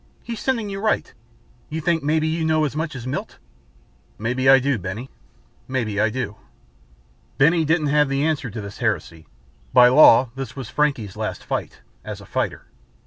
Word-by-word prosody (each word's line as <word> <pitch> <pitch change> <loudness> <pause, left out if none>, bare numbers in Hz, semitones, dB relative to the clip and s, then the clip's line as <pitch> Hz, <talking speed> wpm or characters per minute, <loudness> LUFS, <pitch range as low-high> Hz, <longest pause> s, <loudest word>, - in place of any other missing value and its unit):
He's 230 -2 -6
sending 235 -5 -1
you 195 -1 -5
right. 215 +1 -1 0.6
You 155 +1 -3
think 165 +1 +1
maybe 155 +2 +1
you 160 +1 -1
know 155 -1 +2
as 145 - -4
much 155 -1 -3
as 125 -2 -7
Milt?" 130 - -5 0.8
"Maybe 125 +4 0
I 135 - +9
just 125 - -2
do, 140 -4 +1
Benny. 100 +8 -6 0.6
Maybe 115 -6 -1
I 110 - +3
do." 120 -2 -4 1.0
Benny 165 +4 +4
didn't 155 -1 +1
have 150 -2 +3
the 135 +1 0
answer 150 -5 -1
to 110 0 -6
this 100 0 -9
heresy. 85 - -2 0.5
By 125 0 +8
law 125 -3 +7
this 135 0 -7
was 135 -2 -7
Frankie's 135 -10 0
last - - -4
fight - - -4 0.2
as - - -7
a - - -13
fighter. - - -3
135 Hz, 180 wpm, -22 LUFS, 120-155 Hz, 1.0 s, I